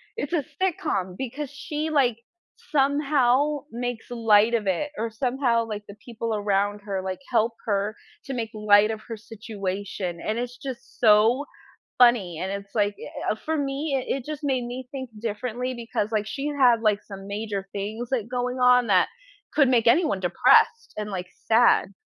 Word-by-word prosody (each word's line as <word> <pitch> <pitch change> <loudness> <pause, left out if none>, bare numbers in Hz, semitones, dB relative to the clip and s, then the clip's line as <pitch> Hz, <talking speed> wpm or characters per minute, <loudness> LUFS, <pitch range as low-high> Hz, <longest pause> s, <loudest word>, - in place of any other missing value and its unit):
it's 290 +4 -4
a 300 -5 +1 0.2
sitcom 195 - -1
because 265 +2 -4
she, 300 +2 -4
like, 255 -7 +2 0.5
somehow 285 0 +2
makes 245 0 -4
light 225 -1 +4
of 215 -4 0
it 285 +11 0
or 225 +1 -2
somehow, 245 0 0
like, 210 -2 -6
the 200 - -10
people 230 -2 -3
around 205 0 0
her, 195 -2 -3
like, 185 +3 -4
help 230 0 +2
her 205 0 0 0.3
to 270 - -4
make 230 -3 -3
light 210 0 +4
of 220 0 -5
her 225 -2 -5
situation, 200 -5 -5
and 220 +2 -2
it's 245 0 -4
just 265 -3 -8
so 225 +5 +5 0.5
funny, 220 -10 +4
and 190 +1 -2
it's 200 +1 -7
like 205 -1 +1
eh - - -3
eh, - - -2
for 320 0 0
me 280 +1 -2
i 260 +1 -1
it 255 - -7
just 305 0 -6
made 260 -3 0
me 250 +1 -6
think 260 -3 -6
differently 240 +3 -3
because, 230 -2 -3
like, 210 -1 0
she 275 +5 -4
had, 255 -6 +4
like, 210 -1 +2
some 195 -1 -10
major 200 -1 -4
things, 215 +4 -4
like, 235 -4 -1
going 250 0 -2
on 250 -1 +5
that 185 -2 +4 0.5
could 285 -3 +5
make 235 -3 +3
anyone 235 - +3
depressed, 460 - +3
and, 210 0 -4
like, 180 -2 -4 0.2
sad. 225 -3 +4
230 Hz, 175 wpm, -25 LUFS, 205-260 Hz, 0.5 s, so